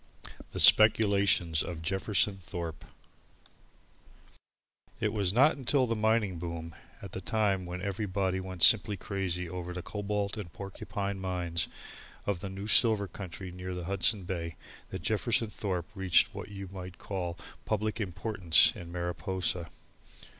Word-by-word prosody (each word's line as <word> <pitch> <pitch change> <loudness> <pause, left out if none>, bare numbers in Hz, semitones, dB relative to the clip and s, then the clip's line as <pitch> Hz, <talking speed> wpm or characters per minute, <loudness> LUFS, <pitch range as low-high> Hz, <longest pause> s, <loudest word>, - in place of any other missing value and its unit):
The - - -4
Speculations 100 -6 +5
of 85 -2 -5
Jefferson 95 +1 +1
Thorpe 85 -3 -6 2.1
It 110 -1 0
was 100 -4 +1
not 135 +9 +5
until 135 0 +2
the 115 -1 -1
mining 110 -4 +1
boom, 85 -1 -5 0.3
at 100 - -7
the 95 - -5
time 100 -3 0
when 90 +1 -5
everybody 95 -2 -1
went 95 -3 -2
simply 105 -2 +5
crazy 90 -3 -3
over 90 0 -5
the 90 -1 -5
Cobalt 105 0 -2
and 95 -6 -6
Porcupine 100 +1 -5
mines 90 -3 -2 0.6
of 100 -4 -1
the 100 - -5
new 95 +1 -6
silver 110 -3 +4
country 95 0 -8
near 90 0 -6
the 90 -1 -5
Hudson 100 +2 +2
Bay, 85 -3 -4 0.3
that - - -6
Jefferson 110 -2 +1
Thorpe 95 -3 -3
reached 95 -4 +3
what - - -7
you 100 -1 -7
might 90 -2 -8
call 90 -4 -4 0.3
public 110 +1 -1
importance 90 -2 +4
in 85 -1 -9
Mariposa. 85 0 -1
95 Hz, 140 wpm, -30 LUFS, 90-105 Hz, 2.1 s, Speculations